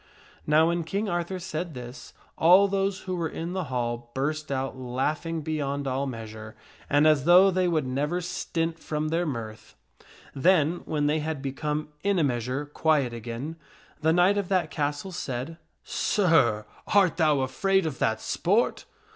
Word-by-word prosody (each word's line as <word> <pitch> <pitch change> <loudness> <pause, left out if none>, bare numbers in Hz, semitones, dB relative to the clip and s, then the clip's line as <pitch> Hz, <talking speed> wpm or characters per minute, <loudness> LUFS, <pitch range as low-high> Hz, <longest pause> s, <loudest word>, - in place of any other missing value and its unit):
Now 155 +2 +5
when 170 0 0
King 200 +6 -2
Arthur 175 +1 -2
said 170 -2 -5
this, 125 +1 -9 0.2
all 185 +5 +6
those 195 0 -1
who 185 - -4
were 170 -2 -2
in 170 +2 -5
the 185 -2 -2
hall 120 -2 -3
burst 155 +2 -2
out 135 0 -2
laughing 150 +6 -2
beyond 145 -2 -2
all 135 +2 -1
measure 110 -3 -8 0.3
and 145 +1 +4
as 155 -3 +4
though 180 +3 +7
they 185 0 +1
would 160 -5 +1
never 145 +7 -1
stint 165 -2 -3
from 155 0 -3
their 170 +2 0
mirth. 110 -5 -6 0.6
Then, 160 +2 +3
when 150 -2 -1
they 150 +2 +2
had 155 -1 -3
become 150 +3 -3
in 200 -1 +2
a 165 - +3
measure 125 +1 -1
quiet 145 -4 +1
again, 120 +7 -6 0.4
the 160 - +3
knight 180 +4 +4
of 195 - -4
that 180 -5 +1
castle 145 +4 -2
said, 155 -3 -4 0.2
" - - -48
Sir, 145 - +2 0.3
art 190 -5 +4
thou 155 -5 +3
afraid 190 +9 +1
of 150 -5 -4
that 110 0 +1
sport 205 +7 0
155 Hz, 165 wpm, -26 LUFS, 130-175 Hz, 0.6 s, though